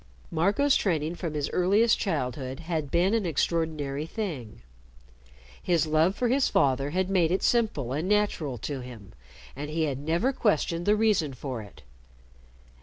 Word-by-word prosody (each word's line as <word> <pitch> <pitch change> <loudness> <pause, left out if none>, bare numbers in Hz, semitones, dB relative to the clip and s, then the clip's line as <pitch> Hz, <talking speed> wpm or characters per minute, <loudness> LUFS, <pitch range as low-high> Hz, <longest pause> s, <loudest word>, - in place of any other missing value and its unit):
Marco's 200 - +2
training 160 -4 0
from 170 -3 -5
his 145 -1 -1
earliest 205 +6 +3
childhood 135 - -3
had 160 -3 -3
been 180 +6 +2
an 225 -2 +1
extraordinary 155 -3 -1
thing. 160 - -5 1.0
His 170 -4 +2
love 160 +5 +2
for 245 - 0
his 260 +3 +2
father 135 0 +2
had 185 +4 0
made 180 -4 +2
it 190 - 0
simple 205 - +1
and 160 +7 -2
natural 205 -11 0
to 145 -3 -3
him, 120 -6 -11 0.4
and 145 +2 -5
he 160 +1 -1
had 140 -4 -1
never 170 - 0
questioned 175 - 0
the 210 - +5
reason 210 -11 +1
for 130 -2 -5
it. 100 -10 -14
160 Hz, 155 wpm, -27 LUFS, 140-195 Hz, 1.0 s, the